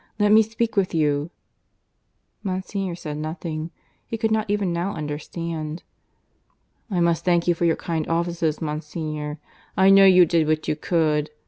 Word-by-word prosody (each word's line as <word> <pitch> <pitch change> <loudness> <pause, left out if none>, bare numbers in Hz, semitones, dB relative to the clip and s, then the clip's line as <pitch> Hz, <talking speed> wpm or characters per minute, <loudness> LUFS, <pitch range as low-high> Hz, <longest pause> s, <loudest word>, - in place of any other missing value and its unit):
Let 210 0 +3
me 215 +1 +8
speak 225 +1 -2
with 190 -3 +1
you." 150 -1 +1 1.1
Monsignor 190 -1 -3
said 150 -3 -6
nothing. 155 +1 -4 0.4
He 225 - -4
could 225 0 0
not 220 -1 0
even 200 -4 0
now 175 +4 -2
understand. 155 +1 -5 1.1
"I 185 -4 -1
must 170 -1 +2
thank 175 -1 +2
you 175 - +5
for 170 +1 -1
your 165 - +3
kind 160 -2 -3
offices, 165 -2 -1
Monsignor. 150 0 -4 0.4
I 190 +1 +6
know 195 0 +8
you 185 -2 +7
did 165 -2 +1
what 155 0 0
you - - +1
could. 155 -2 0
170 Hz, 155 wpm, -23 LUFS, 155-190 Hz, 1.1 s, me